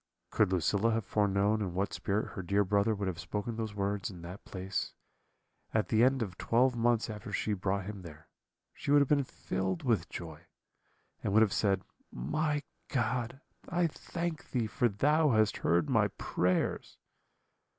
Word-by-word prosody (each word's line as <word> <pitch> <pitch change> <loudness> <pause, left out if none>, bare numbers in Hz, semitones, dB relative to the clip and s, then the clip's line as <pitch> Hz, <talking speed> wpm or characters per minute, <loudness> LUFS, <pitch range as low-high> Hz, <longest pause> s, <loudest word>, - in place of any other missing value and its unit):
"Could - - +3
Lucilla 100 +6 +2
have 110 -3 -1
foreknown 105 +1 +2
in 90 -4 -3
what 95 +2 -1
spirit 105 +2 -1
her 95 - -6
dear 100 +3 +2
brother 100 +3 +2
would 100 -1 -2
have 90 -3 -3
spoken 105 +7 -3
those 110 -2 -4
words 100 0 -1
in 90 -4 -10
that 90 +4 -8
place, 95 0 -4 0.8
at 110 - +1
the 110 0 +4
end 130 -1 +3
of 95 -5 -7
twelve 125 +2 +3
months 115 -1 +2
after 105 -2 -7
she 105 - -1
had 100 -3 -2
brought 95 0 0
him 100 -1 -6
there, 80 -3 -12 0.5
she - - -7
would 145 0 +7
have 140 - +3
been 145 -2 +4
filled 95 -7 -3
with 110 -9 +1
joy, 85 0 -8 0.8
and 100 - 0
would 110 +1 +7
have 105 - +1
said, 100 -3 +1 0.3
'My 150 - -1 0.3
God, 125 +1 -1 0.3
I 175 0 +2
thank 170 0 -4
Thee, 120 -3 0
for 120 +3 +1
Thou 150 +9 +3
hast 110 -1 +3
heard 85 -2 +2
my - - +3
prayers.' 90 +1 -1
105 Hz, 175 wpm, -31 LUFS, 95-120 Hz, 0.8 s, would